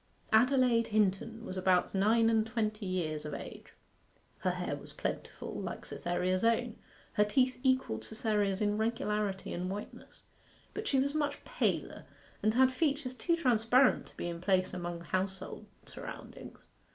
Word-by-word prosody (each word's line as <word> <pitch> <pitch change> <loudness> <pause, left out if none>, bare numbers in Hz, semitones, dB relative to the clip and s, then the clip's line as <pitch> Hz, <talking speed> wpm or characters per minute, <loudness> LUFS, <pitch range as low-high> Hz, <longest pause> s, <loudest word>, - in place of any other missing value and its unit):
Adelaide 245 0 +4
Hinton 215 +2 0
was 185 - -5
about 185 -1 +2
nine 220 +4 +4
and 225 -1 +3
twenty 215 -3 -2
years 160 -5 -2
of 150 - -4
age. - - -8 0.7
Her - - +1
hair - - -2
was - - -11
plentiful, - - -4
like - - -5
Cytherea's 180 +2 -1
own; 230 0 +2 0.4
her 210 - +4
teeth 255 +5 +2
equalled 260 - +1
Cytherea's 210 - 0
in 205 0 +1
regularity 210 -3 -1
and 180 +1 -3
whiteness. 205 +2 -8 0.5
But 430 0 -4
she 275 - +2
was 280 +2 +1
much 290 -2 -1
paler, - - -1 0.4
and 215 +1 +2
had 260 +1 +5
features 280 -1 0
too 340 +6 +1
transparent 250 -3 +3
to - - -21
be - - -3
in 170 -1 -5
place 185 -1 +2
among 175 -1 -4
household 185 +3 -3 0.2
surroundings. - - -10
215 Hz, 150 wpm, -32 LUFS, 185-250 Hz, 0.7 s, had